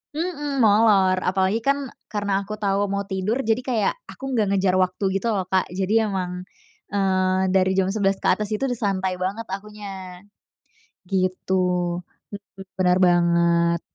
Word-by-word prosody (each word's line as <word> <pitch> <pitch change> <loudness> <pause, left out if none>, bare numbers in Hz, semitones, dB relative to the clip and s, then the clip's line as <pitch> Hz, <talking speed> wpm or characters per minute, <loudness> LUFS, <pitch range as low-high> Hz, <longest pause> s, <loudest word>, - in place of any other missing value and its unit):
mhm, 295 -5 -2
molor, 200 -3 +4
apalagi 190 +3 +1
kan, 275 +1 -1 0.2
karena 205 -2 -1
aku 215 - -4
tahu 200 -1 0
mau 200 +1 -2
tidur, 200 +7 -2
jadi 225 +2 +1
kayak, 245 -5 0
aku - - -13
enggak 220 -5 +1
ngejar 185 -1 +2
waktu 185 +2 0 0.2
gitu 235 - -3
loh 190 - 0
Kak, 190 -1 +2
jadi 210 +4 +1
memang, 180 -2 -4 0.5
eee, 185 -1 +1
dari 190 0 +3
jam 190 0 +2
11.00 195 -2 0
ke - - +1
atas 210 -1 +1
itu 215 - -2
udah 245 - -2
santai 190 -4 -1
banget 195 +5 -2
akunya, 195 -3 -8 0.8
gitu 185 0 -1 0.8
mhm, 200 -1 -10 0.2
benar 180 0 +3
banget. 170 -1 +3
195 Hz, 150 wpm, -23 LUFS, 185-215 Hz, 0.8 s, molor